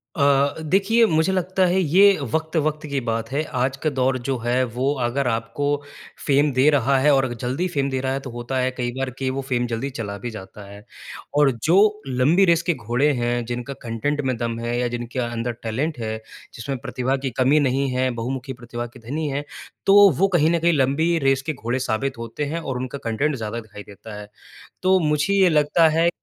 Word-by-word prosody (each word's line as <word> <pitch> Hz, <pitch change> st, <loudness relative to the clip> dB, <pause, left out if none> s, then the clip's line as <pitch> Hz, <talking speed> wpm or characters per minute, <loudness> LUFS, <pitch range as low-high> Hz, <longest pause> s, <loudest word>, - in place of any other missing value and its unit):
अ, 140 Hz, -1 st, +3 dB
देखिए 195 Hz, +8 st, +3 dB
मुझे 160 Hz, +1 st, +2 dB
लगता 185 Hz, 0 st, +1 dB
है 180 Hz, +2 st, +2 dB
ये 190 Hz, +5 st, +5 dB, 0.2 s
वक़्त-वक़्त 155 Hz, -1 st, -1 dB
की 140 Hz, -1 st, -1 dB
बात 115 Hz, -1 st, -2 dB
है। 150 Hz, +3 st, 0 dB, 0.2 s
आज 130 Hz, +1 st, 0 dB
का 155 Hz, -, +2 dB
दौर 130 Hz, -1 st, 0 dB
जो 135 Hz, -2 st, 0 dB
है 120 Hz, +2 st, +1 dB
वो 135 Hz, +3 st, +1 dB
अगर 130 Hz, +2 st, -1 dB
आपको 115 Hz, +5 st, -2 dB, 0.6 s
फ़ेम 145 Hz, 0 st, +3 dB
दे 130 Hz, +4 st, +4 dB
रहा 140 Hz, -1 st, +2 dB
है 150 Hz, +2 st, +4 dB
और 135 Hz, -3 st, +1 dB
जल्दी 130 Hz, +9 st, -2 dB
फ़ेम 140 Hz, 0 st, +1 dB
दे 130 Hz, -1 st, -2 dB
रहा 130 Hz, 0 st, -1 dB
है 135 Hz, -, -2 dB
तो -, -, -5 dB
होता 120 Hz, +2 st, -4 dB
है 130 Hz, 0 st, +1 dB
कई 125 Hz, -1 st, -3 dB
बार 135 Hz, -1 st, -1 dB
कि 130 Hz, -1 st, -1 dB
वो 135 Hz, +1 st, -2 dB
फ़ेम 120 Hz, -1 st, +1 dB
जल्दी 115 Hz, +4 st, -3 dB
चला 100 Hz, -6 st, -5 dB
भी 120 Hz, +5 st, -5 dB
जाता 100 Hz, 0 st, -10 dB
है। 100 Hz, +1 st, -12 dB, 0.5 s
और 145 Hz, -2 st, +5 dB
जो 170 Hz, +4 st, +4 dB, 0.3 s
लंबी 140 Hz, +10 st, +3 dB
रेस 170 Hz, -1 st, +3 dB
के -, -, +4 dB
घोड़े 125 Hz, +4 st, 0 dB
हैं, 120 Hz, -1 st, -1 dB
जिनका 125 Hz, +3 st, -5 dB
कंटेन्ट 140 Hz, +5 st, -2 dB
में 130 Hz, -2 st, -1 dB
दम 115 Hz, -1 st, -3 dB
है 120 Hz, +1 st, -2 dB
या 125 Hz, -, +1 dB
जिनके 120 Hz, +1 st, -5 dB
अंदर 120 Hz, 0 st, -2 dB
टैलेंट 130 Hz, +7 st, -2 dB
है। 110 Hz, -1 st, -3 dB, 0.4 s
जिसमें 130 Hz, +3 st, -4 dB
प्रतिभा 130 Hz, +1 st, -2 dB
की -, -, +1 dB
कमी 140 Hz, +4 st, +4 dB
नहीं 135 Hz, 0 st, +1 dB
है, 130 Hz, 0 st, +1 dB
बहुमुखी 130 Hz, +2 st, -4 dB
प्रतिभा 120 Hz, -1 st, -6 dB
के -, -, -11 dB
धनी 155 Hz, +2 st, -2 dB
हैं। 140 Hz, +1 st, -2 dB, 0.4 s
तो 200 Hz, 0 st, +8 dB
वो 195 Hz, -, +5 dB
कहीं 155 Hz, +1 st, +3 dB
ना 170 Hz, 0 st, +2 dB
कहीं 170 Hz, +1 st, +3 dB
लंबी 150 Hz, +5 st, +2 dB
रेस 135 Hz, -1 st, +2 dB
के 155 Hz, -, 0 dB
घोड़े 125 Hz, 0 st, -3 dB
साबित 130 Hz, +4 st, -1 dB
होते 115 Hz, +5 st, -5 dB
हैं 170 Hz, -, -1 dB
और 135 Hz, -6 st, -4 dB
उनका 130 Hz, +2 st, -5 dB
कंटेन्ट 140 Hz, +6 st, 0 dB
ज़्यादा 115 Hz, 0 st, -4 dB
दिखाई 105 Hz, -2 st, -11 dB
देता 105 Hz, +1 st, -11 dB
है। 105 Hz, -, -10 dB, 0.6 s
तो 185 Hz, 0 st, +4 dB
मुझे 150 Hz, +3 st, +1 dB
ये 190 Hz, -2 st, +5 dB
लगता 155 Hz, +1 st, +4 dB
है 170 Hz, +1 st, +4 dB
135 Hz, 215 wpm, -22 LUFS, 120-150 Hz, 0.6 s, तो